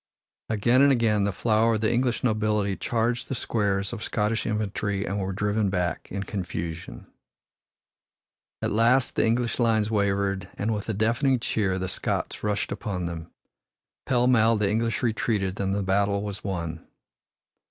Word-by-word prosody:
Again 120 +4 +3
and 140 0 +6
again 110 -5 +2
the 100 - +1
flower 110 +3 +2
of 110 - -2
the 110 +1 +2
English 120 0 0
nobility 105 -3 +1
charged 120 +3 -1
the 135 - -3
squares 100 -3 -1
of 115 - -6
Scottish 105 +1 -1
infantry 105 -2 -1
and 100 +1 -2
were 95 0 -2
driven 105 +1 0
back 90 -3 -2
in 100 +1 -3
confusion. 85 - -5 1.6
At - - 0
last 115 +4 +3
the - - +2
English 120 +2 0
lines 110 -2 +2
wavered 100 -2 0
and 110 +2 0
with 105 +1 -4
a 110 - -1
deafening 120 +5 +2
cheer 100 -5 0
the 95 0 -2
Scots - - -3
rushed 105 -1 -1
upon 90 -4 -3
them. 85 -1 -6 0.8
Pell 125 -1 +3
mell 115 -2 +4
the 105 -2 +1
English 115 +2 0
retreated 105 -4 0
and 95 0 0
the 100 - -1
battle 100 +1 +1
was 100 -1 -4
won. 85 -4 -4
105 Hz, 160 wpm, -26 LUFS, 100-115 Hz, 1.6 s, and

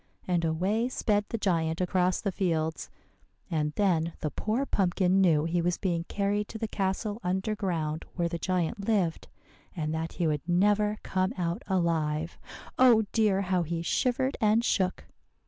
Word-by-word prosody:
And 175 -2 +1
away 190 +9 0
sped 210 -5 0
the 230 - -2
giant 165 -5 0
across 180 0 +1
the 200 - -1
fields; 160 -5 -1 0.6
and 150 -2 0
then 170 -4 +1
the 150 - -2
poor 230 +6 -1
pumpkin 190 -3 +2
knew 160 -5 +4
he 170 +1 0
was 175 +1 0
being 170 -4 -1
carried 205 +2 -1
to 225 - -7
the 225 0 -3
castle 205 +2 -2
under 190 +4 -1
ground 165 -6 -2
where 170 -1 0
the 170 0 -4
giant 185 +2 -1
lived, 190 -7 0 0.5
and 155 -2 -2
that 160 0 -3
he 175 - -1
would 150 -2 0
never 210 +4 +3
come 185 +3 0
out 170 -1 -2
alive 165 -3 0 0.4
oh, 240 -4 +6
dear, 210 -4 +2
how 185 -2 +1
he 165 0 -3
shivered 255 +8 0
and 220 +2 +3
shook! 185 -5 0
185 Hz, 165 wpm, -28 LUFS, 165-205 Hz, 0.6 s, oh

